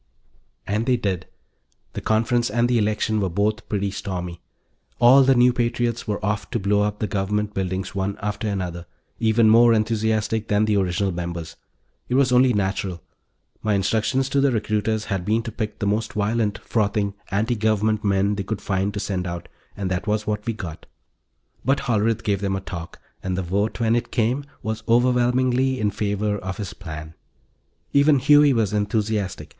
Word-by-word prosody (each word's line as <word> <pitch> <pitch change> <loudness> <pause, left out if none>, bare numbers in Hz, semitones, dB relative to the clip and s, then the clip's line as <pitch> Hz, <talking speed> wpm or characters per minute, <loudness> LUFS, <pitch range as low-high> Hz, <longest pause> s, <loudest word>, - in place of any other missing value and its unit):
And 110 +3 -1
they 125 -1 +3
did. 95 -7 -2 0.7
The - - -5
conference 115 +2 +1
and 120 +3 +2
the 120 -1 +2
election 110 +1 0
were 95 - 0
both 105 +5 -1
pretty 100 -1 -1
stormy. 90 -3 -5 0.6
All 125 +3 +7
the 135 0 +4
new 125 0 +5
patriots 120 -1 -1
were 105 -2 -2
off 105 0 -2
to 120 - -1
blow 100 +1 +2
up 105 0 -1
the 105 - -1
Government 105 +1 -1
buildings 95 -1 -3
one 100 0 -2
after 105 +1 -3
another, 90 -4 -3 0.3
even 110 0 +3
more 115 +1 +6
enthusiastic 110 0 0
than 105 +1 +2
the 105 -1 +1
original 95 +1 0
members. 85 -2 -5 0.5
It 125 - +1
was 135 -1 +3
only 125 +1 +5
natural; 95 -4 -2 0.6
my 105 -1 +1
instructions 110 +7 +1
to 140 0 +2
the 140 -1 +3
recruiters 110 -1 -1
had 95 -2 -2
been 110 +4 +1
to 115 - -5
pick 105 -1 -4
the - - -3
most 105 +2 -1
violent, 105 0 0
frothing 100 -2 -1 0.2
anti 110 +5 0
Government 110 0 +1
men 100 0 +2
they 100 -1 -3
could 110 +2 -4
find 95 +1 -1
to - - -2
send 95 -3 -2
out, 85 0 -6 0.3
and 95 -2 -3
that 95 +4 -2
was 105 0 0
what 105 0 -3
we 115 - 0
got. 90 -7 -8 0.8
But 135 +1 +1
Hollerith 115 -4 0
gave 100 -2 0
them 100 -1 0
a 95 - -3
talk, 85 -4 -8 0.2
and 95 -1 -2
the 95 - -1
vote, 100 +6 -1
when 115 -1 +2
it 120 - -1
came, 125 +5 0 0.2
was 110 0 -3
overwhelmingly 125 +2 +2
in 105 -1 +1
favor 105 0 -1
of 95 +1 -5
his 100 -4 -5
plan. 80 -3 -8 0.8
Even 140 +1 +5
Huey 145 +2 +6
was 110 -5 +1
enthusiastic. 105 -2 -1
105 Hz, 180 wpm, -23 LUFS, 100-115 Hz, 0.8 s, All